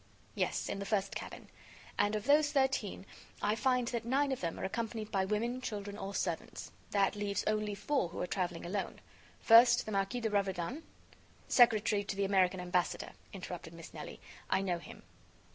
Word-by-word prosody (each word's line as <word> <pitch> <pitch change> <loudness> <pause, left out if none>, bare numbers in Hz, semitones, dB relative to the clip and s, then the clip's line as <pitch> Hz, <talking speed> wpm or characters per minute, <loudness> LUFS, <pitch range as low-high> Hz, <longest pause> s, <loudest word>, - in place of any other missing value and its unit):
"Yes, - - -1
in - - -3
the 200 - -4
first 200 -2 0
cabin. - - -7 0.5
And 205 +1 +2
of 210 - -3
those 295 +1 +5
thirteen, 265 -9 0 0.3
I 210 - +1
find 250 +2 +1
that 235 -2 -2
nine 270 +4 +1
of 265 - -2
them 170 -2 -3
are - - -5
accompanied 220 +2 -3
by 190 -1 +1
women, 230 +5 -1
children 205 -4 -4
or 200 -1 -5
servants. 170 -4 -3 0.2
That 200 0 +2
leaves 205 -1 -1
only 215 -1 0
four 260 - 0
who - - -7
are - - 0
traveling 175 -2 -2
alone. 195 +3 -3 0.4
First, 235 +1 +7
the 215 - -5
Marquis 195 +5 0
de 220 -2 -1
Raverdan 200 - -1 0.4
" - - -29 0.3
"Secretary 215 -4 +4
to 195 - -3
the 200 0 +1
American 190 -1 +3
Ambassador," 180 0 -1 0.2
interrupted - - -7
Miss - - -11
Nelly. - - -8 0.3
"I 190 - +2
know 180 -3 -1
him." - - -12
205 Hz, 180 wpm, -33 LUFS, 195-235 Hz, 0.5 s, First